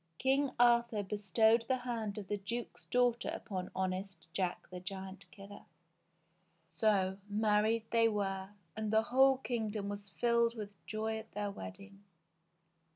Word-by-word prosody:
King 270 +2 +2
Arthur 235 -3 +4
bestowed 220 +3 +3
the 260 - +2
hand 230 -5 -3
of 205 -3 -6
the 205 - -1
duke's 230 +5 -5
daughter 245 -1 +2
upon 185 -5 -4
honest 190 +1 -3
Jack 180 -2 -2
the 180 - -6
Giant 190 0 -7
Killer. 200 +2 -11 1.1
So 195 -3 +2
married 215 +1 +2
they 230 -1 +5
were, 195 -3 -1 0.3
and 220 -1 -2
the 220 0 +4
whole 265 +3 +5
kingdom 220 -5 -2
was 205 0 -6
filled 235 +1 +2
with 210 -2 -6 0.2
joy 220 +2 -2
at 220 0 -12
their 205 -1 -2
wedding. 195 - -9
210 Hz, 140 wpm, -34 LUFS, 195-235 Hz, 1.1 s, they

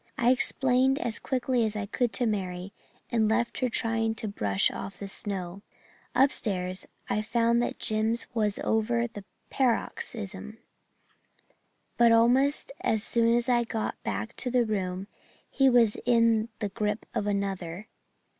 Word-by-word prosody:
I 240 +1 +4
explained 260 +1 +2
as 235 -4 -2
quickly 255 -2 0
as 215 -1 0
I 210 -1 -2
could 240 +3 -1
to 245 - +1
Mary, 190 -3 -3 0.4
and 220 -2 +2
left 235 +1 0
her 255 -2 +1
trying 225 -1 0
to 220 - -5
brush 100 - +1
the 195 +1 -7
snow 195 -2 -3 0.5
off. 255 - +6
Upstairs 185 -8 -1 0.2
I 210 - 0
found 235 +2 +2
that - - -2
Jims 220 +2 0
was 210 -3 0
over 235 +2 +1
that 210 -4 -8 0.3
paroxysm, 215 -4 -2 1.4
but 235 -1 +6
almost 255 +6 +3
as 220 - +1
soon 230 0 +2
as 240 0 0
I 240 -1 +3
got 225 -1 -3
back 105 +2 -4
to 250 - -1
the 245 -1 +2
room 190 -3 -2 0.4
he 270 -1 +3
was 235 -4 +4
in 230 -2 +3
the 205 - -3
grip 210 0 -2
of 205 - -1
another. 195 -1 -3
225 Hz, 145 wpm, -28 LUFS, 200-240 Hz, 1.4 s, off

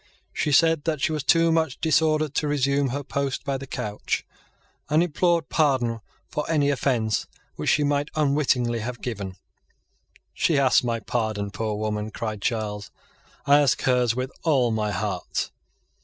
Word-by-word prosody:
She 150 - -1
said 160 +1 +4
that 160 -3 0
she 140 - +1
was 155 -2 -2
too 165 +3 +4
much 160 -4 0
disordered 155 -2 +2
to 150 - 0
resume 140 -1 +1
her 140 +3 -3
post 140 0 -2
by 135 -1 -1
the 135 - -8
couch, 105 -4 -3 0.6
and 155 +3 +4
implored 170 -1 +1
pardon 130 -7 +1 0.3
for 150 - -3
any 145 -3 +2
offence 120 -6 0 0.3
which - - -2
she 150 - +3
might 145 0 0
unwittingly 140 -5 +1
have 120 +2 -5
given. 100 -6 -4 1.0
"She 160 - +1
ask 135 -3 +4
my 115 -2 -1
pardon, 110 -3 -2
poor 110 0 -2
woman!" 105 0 -2
cried 110 -2 -5
Charles; 105 -3 -2 0.6
"I 145 +1 +6
ask 140 -3 +3
hers 125 -3 +2
with 130 +1 -3
all 135 -8 +2
my 110 -1 0
heart." 100 -3 -3
135 Hz, 155 wpm, -24 LUFS, 110-150 Hz, 1.0 s, I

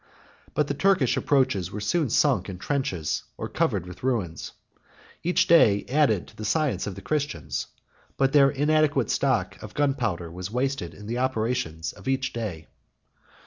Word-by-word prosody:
But 150 - +2
the 140 - -1
Turkish 185 -5 +3
approaches 130 - +1
were 105 - -5
soon 155 +6 0
sunk 110 -6 +2
in 95 - -6
trenches, 95 - -2 0.2
or - - -4
covered 115 - 0
with 90 0 -10
ruins. 110 -11 -2 0.7
Each 175 +2 +2
day 105 -12 +5
added 130 - +2
to - - -19
the 110 - -7
science 145 +5 0
of 100 - -5
the - - -10
Christians; 145 - -2 0.5
but 135 -1 +2
their 140 -2 +6
inadequate 145 -3 +2
stock - - 0
of - - -10
gunpowder 110 - 0
was 90 +2 -6
wasted 125 -5 -2
in 105 - -11
the 120 +3 -3
operations 120 -9 -1
of - - -13
each 130 -1 0
day. 100 -10 -4
125 Hz, 160 wpm, -26 LUFS, 100-140 Hz, 0.7 s, their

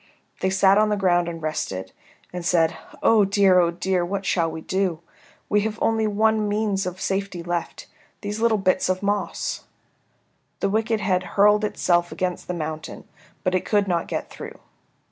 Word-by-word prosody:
They 190 - +1
sat 190 +1 +4
on 215 0 +3
the 210 - +1
ground 175 -3 +2
and 165 -2 -7
rested, 95 -12 -3 0.4
and 180 -1 -5
said, 170 -1 +2 0.3
"Oh 220 -2 +5
dear, 195 -2 +4
oh 170 -1 +3
dear, 180 +1 -1
what 195 +2 -3
shall 170 -3 +1
we 160 0 -7
do? 185 -2 -1 0.5
We 210 - +2
have 215 +1 -3
only 225 -1 +1
one 215 0 +2
means 205 -2 0
of 180 +1 -5
safety 195 -3 -2
left, 175 -1 -4 0.4
these 205 +1 -4
little 225 -1 +3
bits 185 -1 +1
of 185 +1 -1
moss." 205 0 -2 0.9
The - - 0
wicked 220 0 0
head 185 -3 +1 0.2
hurled 210 +1 +5
itself 175 -4 +1
against 180 -1 -3
the 180 - -3
mountain, 155 -1 -6 0.4
but 185 - 0
it 185 - +1
could 205 -2 +1
not 170 -2 0
get - - -4
through. - - -9
190 Hz, 175 wpm, -23 LUFS, 175-210 Hz, 0.9 s, Oh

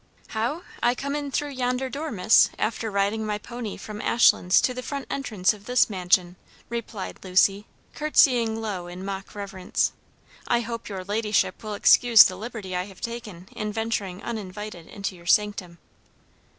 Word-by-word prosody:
"How? 240 +10 -2 0.2
I 240 +1 +3
came 280 +2 -3
in 290 -1 -3
through 290 +2 -1
yonder 255 0 -1
door, 295 +4 -4
miss; 215 +1 +5
after 225 0 -1
riding 200 +2 0
my 210 -1 -2
pony 235 0 -7
from 210 0 -7
Ashlands 190 -5 +4
to 250 - +1
the 255 - -5
front 280 +1 -5
entrance 215 -10 0
of 205 -1 -14
this 250 -2 +3
mansion," 180 -1 +1 0.3
replied 230 -4 -5
Lucy, 195 +2 +2 0.3
courtesying 245 -7 +3
low 200 -6 -4
in 180 +2 -8
mock 195 0 -6
reverence. 195 -2 -1 0.6
"I 240 0 +2
hope 230 -1 -6
your 190 -2 -5
ladyship 210 -2 0
will 215 -1 -5
excuse 235 +2 +7
the 185 - 0
liberty 210 -3 -6
I 180 0 -1
have 195 -2 -14
taken 220 -7 -7
in 215 -1 -3
venturing 210 -4 -3
uninvited 210 -5 -6
into 200 -2 -5
your 170 -1 -15
sanctum." 200 -4 +1
215 Hz, 165 wpm, -25 LUFS, 190-235 Hz, 0.6 s, excuse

